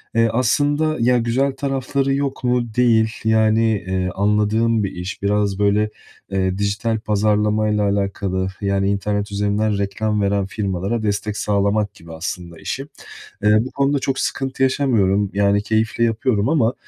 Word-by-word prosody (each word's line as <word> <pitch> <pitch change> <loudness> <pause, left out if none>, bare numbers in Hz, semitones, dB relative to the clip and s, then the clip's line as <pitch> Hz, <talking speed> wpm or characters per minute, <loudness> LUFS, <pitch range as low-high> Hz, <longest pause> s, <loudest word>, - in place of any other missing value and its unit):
Eee, 115 0 +4
aslında 145 +5 +1
ya 125 +1 +3
güzel 125 +4 +1
tarafları 135 0 -1
yok 140 -1 -2
mu? 125 -2 0
Değil, 115 -3 +3
yani. 110 0 +3
Eee, 95 -1 -1
anladığım 105 +2 +2
bir 95 - -2
iş. 90 +3 -6
Biraz 100 -1 0
böyle, 105 +1 +2 0.4
eee, 95 0 0
dijital 105 +2 -1
pazarlamayla 105 0 +1
alakalı, 100 -2 -1
yani, 100 0 +1
internet 100 0 -2
üzerinden 105 +1 0
reklam 105 +1 -1
veren 100 -1 +1
firmalara 100 +2 -2
destek 105 0 -2
sağlamak 100 0 0
gibi 85 -4 -13
aslında 85 0 -6
işim. 135 +9 -5 0.5
Iıı, 105 +3 +4
bu - - -7
konuda 140 0 +1
çok 135 0 -2
sıkıntı 135 -1 -2
yaşamıyorum, 105 -8 +2
yani, 100 0 +2
keyifle 110 +2 0
yapıyorum 115 0 +1
ama, 130 -6 +2
105 Hz, 140 wpm, -20 LUFS, 100-120 Hz, 0.5 s, Eee